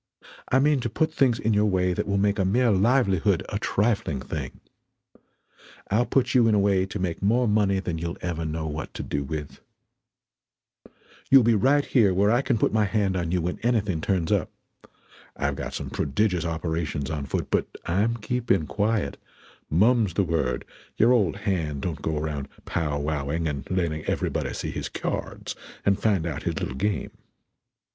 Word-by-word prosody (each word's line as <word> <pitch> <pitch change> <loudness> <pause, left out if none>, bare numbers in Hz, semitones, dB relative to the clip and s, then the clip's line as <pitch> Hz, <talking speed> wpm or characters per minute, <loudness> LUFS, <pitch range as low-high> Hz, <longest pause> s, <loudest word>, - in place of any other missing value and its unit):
I 130 - +5
mean 145 +1 +3
to 120 - -2
put 155 +8 0
things 125 -4 +3
in 110 -1 0
your 105 +1 +3
way 90 -2 +1
than - - -2
will 100 0 +1
make 100 0 +1
a - - +3
mere 115 +5 +3
livelihood 100 -2 +2
a - - -2
trifling 100 - 0
thing. - - -6 1.3
I'll 115 +4 +2
put 130 -1 +1
you 120 -3 +5
in 110 - +4
a - - +3
way 100 -1 +2
to 100 - -5
make 90 -4 -3
more 120 +5 +2
money 105 -2 +2
that 85 -4 -3
you'll 85 +1 -4
ever 85 -2 -3
know 80 0 -3
what 75 0 -5
to - - -4
do 70 -1 -2
with. 75 +1 -6 1.7
You'll 135 -2 +8
be 115 +1 +4
right 135 +7 +3
here 105 -8 +3
where 100 +3 +3
I 120 +3 +3
can 130 -3 0
put - - +1
my 110 -1 +3
hand 100 -1 0
on 85 -2 -1
you 90 -2 0
when 90 +1 -3
anything 105 -8 0
turns 90 -3 0
up. - - +1 0.9
I've 70 0 -1
got - - -5
some - - -5
prodigious 90 +5 0
operations 80 -2 -2
on 75 -3 -3
foot; - - -3
but - - +1 0.2
I'm 105 +7 +1
keeping 115 -6 0
quiet; 105 +5 -1 0.5
mum's 105 +2 +3
the 100 - +3
word; 80 -8 -1 0.3
your 120 +3 +5
old 100 -8 +2
hand 85 -9 -2
don't 85 -4 -3
go 80 -1 -1
around 75 -2 -3 0.2
pow 75 -3 -1
wowing 75 +2 -1
and 70 -3 -4
letting 85 -4 -1
everybody - - -1
see - - -4
his - - -4
k'yards - - -4 0.3
and 100 0 +2
find 100 -7 +2
out 80 -5 -3
his - - -2
little - - -3
game. 100 +10 -2
95 Hz, 185 wpm, -25 LUFS, 80-110 Hz, 1.7 s, You'll